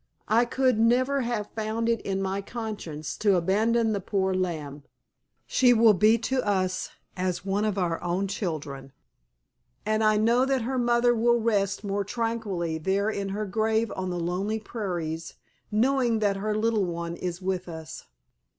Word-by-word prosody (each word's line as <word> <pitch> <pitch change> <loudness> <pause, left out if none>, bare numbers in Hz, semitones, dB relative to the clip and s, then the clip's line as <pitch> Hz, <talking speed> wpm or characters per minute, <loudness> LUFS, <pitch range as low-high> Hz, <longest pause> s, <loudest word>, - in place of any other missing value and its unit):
"I 230 +3 +4
could 255 -1 +1
never 255 +4 +3
have 235 -4 -3
found 220 +1 -2
it 230 -1 +1
in 195 0 -2
my 195 +1 -2
conscience 200 -9 -5
to 205 -3 +3
abandon 220 +6 +2
the 200 - -1
poor 190 -1 0
lamb. 155 -6 -3 0.6
She 250 -2 +4
will 225 -2 +6
be 215 +4 +4
to 260 -1 0
us 185 -2 0 0.3
as 185 0 -2
one 200 +2 0
of 210 -2 -1
our 175 -3 -1
own 180 +3 -1
children, 150 -9 -5 0.9
and 215 0 +1
I 215 0 +4
know 230 +4 +3
that 265 -2 +1
her 260 +2 -1
mother 240 0 +3
will 235 +1 +3
rest 205 -3 0
more 200 0 -1
tranquilly 205 -7 -2
there 195 +6 0
in 200 -2 -3
her 210 +2 -2
grave 220 +2 0
on 185 -1 -3
the 175 -1 -3
lonely 190 +6 -1
prairies 175 -7 -4 0.3
knowing 240 +1 +2
that 205 -2 +1
her 210 +2 -1
little 220 -2 +1
one 170 -1 -4
is 175 -1 -4
with 185 -1 -3
us. 160 -1 -8
205 Hz, 165 wpm, -26 LUFS, 185-230 Hz, 0.9 s, will